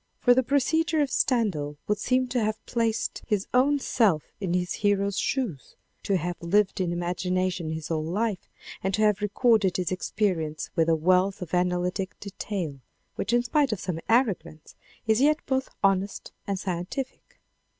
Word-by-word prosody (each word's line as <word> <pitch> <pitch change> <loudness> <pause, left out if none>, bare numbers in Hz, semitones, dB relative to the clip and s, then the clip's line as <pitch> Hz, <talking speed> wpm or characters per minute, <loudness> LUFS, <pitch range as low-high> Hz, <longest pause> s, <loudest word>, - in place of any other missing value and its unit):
For 245 - +5
the 260 - +4
procedure 315 +5 +1
of 280 -3 0
Stendhal 180 - 0
would 210 -1 0
seem 255 +3 +1
to 245 -2 0
have 215 0 -2
placed 230 -2 -1
his 210 -3 0
own 275 +4 +4
self 210 - +2 0.2
in 185 -3 -1
his 180 0 -1
hero's 200 -1 +2
shoes, 225 - -2 0.3
to 195 - +1
have 175 +1 -4
lived 195 +3 +2
in 175 -2 0
imagination 180 0 -1
his 160 -1 -5
whole 160 -2 -1
life, 200 +4 -2 0.3
and 190 0 +1
to 215 - +1
have 210 -1 +3
recorded 210 -2 +2
his 180 -1 -1
experience 180 -5 -1
with 165 0 +2
a 165 - +4
wealth 185 +4 +2
of 175 - -11
analytic 180 +2 0
detail, 190 -7 -5 0.3
which 205 - -3
in 240 0 +3
spite 275 +2 +2
of 215 - -2
some 180 -3 -3
arrogance, 195 - 0 0.3
is 220 +2 +3
yet 300 +2 +5
both 265 0 -1
honest 195 0 +1 0.2
and 200 -1 -1
scientific. 185 +8 -5
195 Hz, 165 wpm, -26 LUFS, 180-230 Hz, 0.3 s, For